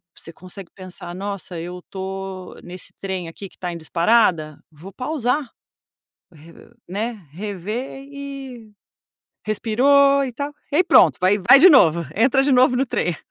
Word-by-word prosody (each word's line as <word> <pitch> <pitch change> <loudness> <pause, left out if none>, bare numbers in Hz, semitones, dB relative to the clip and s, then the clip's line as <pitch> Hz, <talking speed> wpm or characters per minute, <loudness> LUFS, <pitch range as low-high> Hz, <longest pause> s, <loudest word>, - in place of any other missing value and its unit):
você 165 - -12
consegue 185 +2 -12
pensar: 180 -2 -7
“Nossa, 195 -3 -5
eu 180 +2 -7
tô 190 -1 -7
nesse 180 +1 -10
trem 190 -3 -4
aqui 190 +4 -10
que - - -25
tá 180 -1 -5
em - - -6
disparada, 170 -2 +1
vou 175 +6 -13
pausar”. 260 0 -2 0.8
Re 160 +2 -16 0.4
né, 210 0 -4
rever 210 - -6
e 270 -5 -9 0.7
respirou 275 +6 +3
e 255 - -4
tal, 285 +4 -5 0.2
ai 335 - +5
pronto, 370 - +5
vai 190 +3 +3
vai 230 +8 +6
de 370 - +8
novo, 170 - +5
entra 255 +5 +3
de 280 - +1
novo 250 0 +4
no 270 - +1
trem. 175 -8 -2
200 Hz, 150 wpm, -21 LUFS, 180-255 Hz, 0.8 s, de